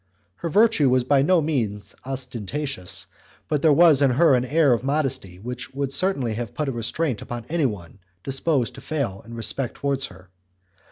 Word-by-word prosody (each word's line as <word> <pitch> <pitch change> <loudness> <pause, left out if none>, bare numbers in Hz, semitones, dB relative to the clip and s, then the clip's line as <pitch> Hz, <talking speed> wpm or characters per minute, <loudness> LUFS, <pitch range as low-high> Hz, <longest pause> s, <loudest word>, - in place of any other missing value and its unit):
Her 170 - -4
virtue 205 - +4
was 130 0 +3
by 135 +2 +3
no 170 +4 +3
means 115 -10 -2
ostentatious, 130 -3 -3 0.4
but 150 -2 0
there 160 - +5
was 155 -2 +6
in 140 - +5
her 140 +4 +4
an 125 -1 +2
air 145 0 +3
of 120 - -1
modesty 135 -10 -1
which 125 +6 -7
would 140 -1 -2
certainly 140 - +1
have 115 0 -5
put 150 - -2
a - - -1
restraint 120 +2 -2
upon 120 -1 -6
anyone 110 - -2 0.2
disposed 135 -2 0
to - - -11
fail 135 -11 -3
in 115 +1 -10
respect 120 +2 -2
towards 140 -1 -1
her. 90 -1 -17
135 Hz, 175 wpm, -23 LUFS, 115-150 Hz, 0.4 s, was